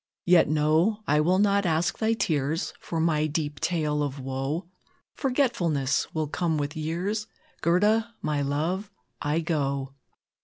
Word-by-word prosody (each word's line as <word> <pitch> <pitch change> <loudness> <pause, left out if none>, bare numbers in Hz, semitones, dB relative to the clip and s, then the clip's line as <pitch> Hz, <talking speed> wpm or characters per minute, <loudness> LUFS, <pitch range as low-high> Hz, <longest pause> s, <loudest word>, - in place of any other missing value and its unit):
Yet, 175 -4 +5
no! 160 +8 +2
I 150 -2 +3
will 180 +4 +3
not 200 0 +3
ask 165 -1 0
thy 225 0 +2
tears 155 -5 -1
For 165 - -4
my 155 -2 +2
deep 150 -1 -3
tale 150 -4 0
of 140 -1 -2
woe; 135 +6 -3 0.5
Forgetfulness 175 - 0
will 155 -1 -1
come 160 +1 -1
with 145 +2 -3
years; 180 +8 -2 0.3
Gerda 215 +7 +2
my 150 -1 -1
love 160 +8 -1 0.3
I 150 +2 0
go!" 140 -4 -1
160 Hz, 140 wpm, -26 LUFS, 150-185 Hz, 0.5 s, Yet